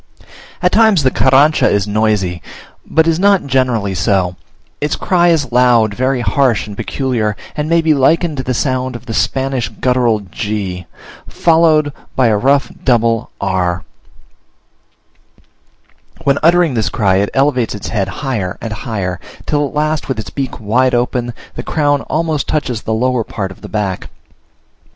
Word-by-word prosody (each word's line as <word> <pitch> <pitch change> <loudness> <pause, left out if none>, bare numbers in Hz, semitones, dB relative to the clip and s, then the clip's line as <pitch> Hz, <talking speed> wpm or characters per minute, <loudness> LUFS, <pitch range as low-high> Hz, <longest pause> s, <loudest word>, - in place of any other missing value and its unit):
At 180 - +3
times 220 -8 +4
the 130 - +3
Carrancha 135 +5 +4
is 100 -1 +1
noisy, 105 -5 0 0.5
but 160 0 +3
is 165 0 +1
not 200 -2 +3
generally 125 -7 0
so: 90 0 0 0.5
its 150 0 0
cry 175 -2 +2
is 150 -7 +1
loud, 120 -3 +3
very 130 +2 0
harsh 120 +2 +1
and 105 -1 -9
peculiar, 115 -4 -2 0.2
and 150 +1 -2
may 170 0 +3
be 160 -1 +3
likened 155 +3 +2
to 130 - -2
the 130 0 -2
sound 130 0 -1
of 120 - -9
the 115 - -5
Spanish 130 +1 -1
guttural 125 -4 +1
g, 100 -2 -4 0.4
followed 160 -3 +3 0.2
by 125 -3 +3
a 110 - +3
rough 135 +4 +2
double 115 -3 +1
r 100 -1 -1
r; 90 -1 -1 2.4
when 140 0 +2
uttering 170 -2 +4
this 110 -3 0
cry 95 -5 +1
it 100 +1 +1
elevates 135 -5 +1
its 105 - -6
head 100 -4 -1
higher 105 -5 -3
and 115 -2 -5
higher, 95 -4 -4 0.3
till 145 -1 0
at 140 - -12
last, 155 +1 -1
with 135 - -2
its 110 - -6
beak 135 -3 -4
wide 125 +4 +1
open, 120 0 -1 0.2
the - - -5
crown 145 -2 0
almost 155 -2 -1
touches 130 -7 -2
the - - -4
lower 125 0 0
part 95 -3 -5
of - - -14
the - - -9
back. 100 -4 -3
125 Hz, 160 wpm, -15 LUFS, 105-145 Hz, 2.4 s, times